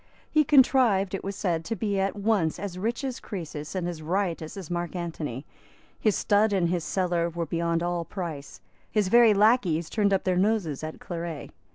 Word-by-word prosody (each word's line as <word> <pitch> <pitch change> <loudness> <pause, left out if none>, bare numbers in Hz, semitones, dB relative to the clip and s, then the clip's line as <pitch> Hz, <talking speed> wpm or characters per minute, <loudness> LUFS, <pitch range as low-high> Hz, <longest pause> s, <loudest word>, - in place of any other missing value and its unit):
He 310 0 +4
contrived, 255 -9 +4
it 195 - -3
was 195 0 -4
said, 170 -5 -1
to 225 - -2
be 205 -3 -1
at 195 +1 0
once 200 -6 +1
as 200 -3 -5
rich 230 +6 -2
as 260 -3 -3
Croesus 160 -5 -6
and 180 -2 -1
as 170 -3 -5
riotous 170 0 -2
as 180 -4 -7
Mark 175 +1 -3
Antony. 155 -7 -4 0.5
His 215 -3 +2
stud 210 0 +2
and 180 -3 +2
his 175 -2 -1
cellar 175 -2 0
were 170 0 -3
beyond 170 +1 -1
all 175 -1 -1
price. 165 -6 -7 0.3
His 210 -4 +1
very 235 -1 +6
lacqueys 195 -7 +3
turned 205 -2 +2
up 195 - +2
their 185 -1 +1
noses 185 -8 0
at 155 0 -6
claret. 170 -3 -6
185 Hz, 190 wpm, -27 LUFS, 170-205 Hz, 0.5 s, very